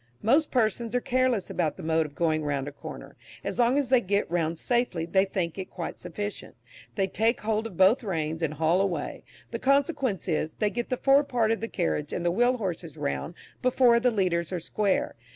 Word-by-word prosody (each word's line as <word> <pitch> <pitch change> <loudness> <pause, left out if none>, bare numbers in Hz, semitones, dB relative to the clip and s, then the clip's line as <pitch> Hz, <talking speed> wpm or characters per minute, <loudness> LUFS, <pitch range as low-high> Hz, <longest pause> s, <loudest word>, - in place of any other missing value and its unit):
Most 285 +8 +3
persons 230 -1 0
are - - +4
careless 250 -5 0
about 160 -4 -1
the - - -8
mode 160 0 +1
of 145 - -17
going 155 -2 +1
round 140 -2 -2
a - - -4
corner; 145 - -10 0.3
as - - -4
long 245 +3 +4
as 280 -4 0
they 255 -2 +5
get 200 0 0
round 165 -1 0
safely, 240 -7 0
they 190 +3 +3
think 185 -2 -3
it 185 - -5
quite 175 -3 -6
sufficient; 205 +4 -6 0.4
they 195 - +2
take 225 +5 0
hold 220 +1 0
of 190 -7 -12
both 195 +8 +5
reins 160 -5 -2
and 155 -2 -1
haul 165 +4 +2
away; 175 -7 -2 0.3
the 230 - -3
consequence 275 - +1
is, 155 -2 -1
they 210 -1 0
get 240 +1 -3
the 255 - 0
fore 275 +3 +4
part 235 -5 +1
of 225 - 0
the 225 - -2
carriage 165 -7 -2
and 175 - -3
the 175 - +3
wheel 245 +6 +2
horses 175 - -4
round 70 -1 -3 0.3
before 250 -2 +4
the 250 +1 +3
leaders 180 -6 0
are 180 - -2
square. 195 +4 0
195 Hz, 210 wpm, -27 LUFS, 165-240 Hz, 0.4 s, they